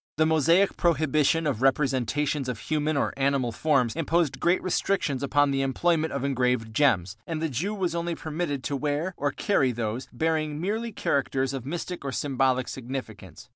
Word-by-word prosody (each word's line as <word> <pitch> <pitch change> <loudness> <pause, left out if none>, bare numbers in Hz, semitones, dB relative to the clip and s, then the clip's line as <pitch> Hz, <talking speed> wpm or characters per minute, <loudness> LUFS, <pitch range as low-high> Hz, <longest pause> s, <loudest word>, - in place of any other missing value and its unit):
The 155 - +4
Mosaic 165 +5 +3
prohibition 155 -1 +2
of 135 -6 -1
representations 135 +1 +1
of 125 - -3
human 155 +3 -1
or - - 0
animal 135 -3 +1
forms 125 -2 +1
imposed 165 -1 0
great 175 +2 +3
restrictions 180 -6 0
upon 145 0 +2
the 135 0 0
employment 160 +4 +1
of 140 -1 -3
engraved 125 -4 0
gems, 105 -8 +2
and 160 -2 -3
the 160 0 -1
Jew 180 - -2
was 180 -4 -1
only 170 0 -2
permitted 155 -4 -3
to 140 - -2
wear 150 +6 -1
or 145 - 0
carry 140 -7 +1
those 115 +1 -3
bearing 155 +2 -1
merely 220 +6 -2
characters 135 - 0
of 130 -2 -5
mystic 175 +2 -4
or 140 - -3
symbolic 130 -2 0
significance. 115 - -7
145 Hz, 170 wpm, -26 LUFS, 130-160 Hz, -, The